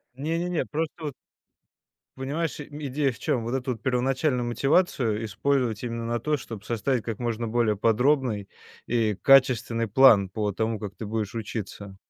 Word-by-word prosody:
Не, 160 +5 -2
не, 175 +1 -2
не, 170 - 0
просто, 160 +1 -4
вот 145 - -3 1.1
понимаешь, 150 +5 -2
ми 145 0 -6
идея 135 0 0
в 110 - -14
чем? 115 -3 0
Вот 120 +3 -3
эту, 130 -1 -1
вот, 110 - -8
первоначальную 130 +1 +1
мотивацию 120 - +1
использовать 125 +1 0
именно 115 -1 -3
на 120 0 -1
то, 150 +6 0
чтоб 115 -5 -9
составить 120 +1 -1
как 115 0 -4
можно 115 -1 -2
более 110 -2 +1
подробный 115 -1 +2 0.4
и 115 -3 +1
качественный 120 -4 +4
план 105 -4 +6
по 105 +2 -2
тому, 110 +2 -2
как 100 -2 -6
ты 110 - -6
будешь 110 0 -3
учиться. 105 -3 -6
120 Hz, 170 wpm, -26 LUFS, 110-135 Hz, 1.1 s, план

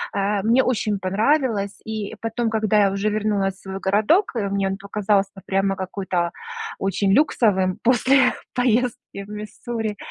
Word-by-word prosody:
Э, 200 0 0
мне 235 +5 +3
очень 215 -4 0
понравилось. 205 - 0
И 220 -1 -4
потом, 225 +1 -2
когда 215 -1 +2
я 195 - +1
уже 200 +2 0
вернулась 205 -2 0
в - - -21
свой 190 0 -6
городок, 215 - +2
а, 205 -3 -1
мне 195 0 0
он 195 - -3
показался 200 0 0
прямо 195 0 +1
какой-то 185 -2 -2 0.5
очень 195 0 +1
люксовым 200 -8 +2
после 255 +1 +4 0.2
поездки 245 -4 0
в 200 - -14
Миссури. 215 +1 -5
210 Hz, 150 wpm, -22 LUFS, 195-225 Hz, 0.5 s, после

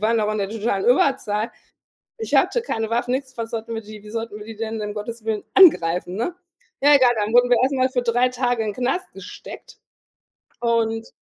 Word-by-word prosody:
waren 225 +2 +2
doch 210 -1 0
in 215 - -3
der 195 -1 -1
totalen 215 -3 -2
Überzahl. 240 -4 +2 0.7
Ich 445 - -2
hatte 480 - +3
keine 225 - -3
Waffen, 240 +1 0
nix, 260 -1 -4
was 230 -1 -4
sollten 230 0 -5
wir 225 - -4
die 210 0 -12
wie 210 - -11
sollten 225 -2 -5
wir 210 - -10
die 225 - -9
denn, 225 0 -4
um 210 0 -4
Gottes 225 +1 -7
Willen, 220 -2 -2
angreifen, 180 - +5
ne?“ 240 - -3 0.5
Ja, 290 +1 +6
egal, 255 -3 +5
dann 210 +1 -1
wurden 245 0 +5
wir 245 - +5
erst 270 +2 +1
mal 260 0 +2
für 250 -2 -1
3 245 +2 +2
Tage 245 -2 -1
in 215 - -2
'n - - -11
Knast 260 - -2
gesteckt - - -11 0.8
und 225 -1 0
230 Hz, 215 wpm, -22 LUFS, 215-250 Hz, 0.8 s, Ja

